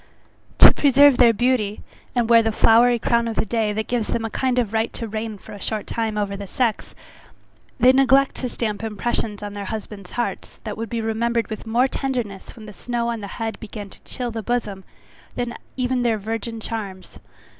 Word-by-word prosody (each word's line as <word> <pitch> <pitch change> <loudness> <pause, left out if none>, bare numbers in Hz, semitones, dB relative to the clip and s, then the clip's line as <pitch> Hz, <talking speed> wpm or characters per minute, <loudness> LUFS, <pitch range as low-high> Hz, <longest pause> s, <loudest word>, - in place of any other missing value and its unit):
To - - +10
preserve 285 -1 +5
their 240 -2 +7
beauty, 225 -2 0 0.3
and 240 -2 +2
wear 230 0 +7
the 225 0 0
flowery 235 +3 +5
crown 235 0 +1
of 225 - -3
the - - +1
day, 220 0 0
that 215 +1 -2
gives 240 -3 -1
them 225 - -1
a 225 - -4
kind 255 +1 0
of 230 -4 0
right 225 +1 0
to 230 - -4
reign 215 0 -4
for - - -14
a 205 - -10
short 215 +1 -2
time 225 -2 -2
over 200 -1 -1
the 200 0 -7
sex, 235 +1 -1 0.8
they 250 +2 +7
neglect 270 +1 +4
to 255 - -3
stamp 215 -3 -3
impressions 220 -1 -2
on 205 0 -5
their 205 -1 -5
husbands' 205 -2 -7
hearts, 240 - -4
that 215 -2 -5
would 225 0 -5
be 230 -1 -2
remembered 230 +1 -1
with 215 +1 -6
more 240 +4 +3
tenderness 245 -8 -4
when 220 - -11
the 210 - -10
snow 235 +2 -2
on 230 -2 -3
the 200 - -5
head 225 -2 -3
began 205 -2 -8
to - - -14
chill 245 -2 -4
the 225 0 -4
bosom, 210 -4 -2 0.5
than 245 -1 -2 0.2
even 255 0 0
their 235 -2 +2
virgin 225 +2 -4
charms. 200 -5 -6
225 Hz, 205 wpm, -22 LUFS, 210-240 Hz, 0.8 s, To